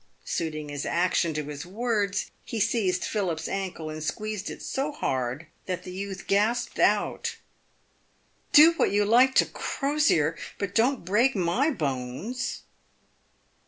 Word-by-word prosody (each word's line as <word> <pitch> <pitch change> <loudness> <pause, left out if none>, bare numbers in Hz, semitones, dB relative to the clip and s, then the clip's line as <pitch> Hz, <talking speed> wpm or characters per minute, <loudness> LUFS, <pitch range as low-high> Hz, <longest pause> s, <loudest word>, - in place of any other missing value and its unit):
Suiting 155 -3 -3
his 145 -1 -4
action 175 -1 +1
to 150 - -1
his 145 0 -6
words, 205 +1 -1
he 230 - -4
seized 195 -4 +1
Philip's 175 -7 -2
ankle, 185 -5 -4
and 155 0 -6
squeezed 210 +4 -3
it - - -8
so 275 +3 -2
hard, 130 - -2 0.2
that 180 -1 -3
the 180 - -8
youth 195 +1 -6
gasped 210 +5 +1
out, - - +1 0.6
" - - -40
Do 310 +2 +9
what - - +3
you 205 +1 +2
like 250 +5 +5
to - - +6
Crosier, 275 - +1 0.2
but 200 -2 -3
don't 235 -1 +2
break 235 +8 +3
my 190 - +2
bones 150 - -3
195 Hz, 140 wpm, -27 LUFS, 160-230 Hz, 0.6 s, Do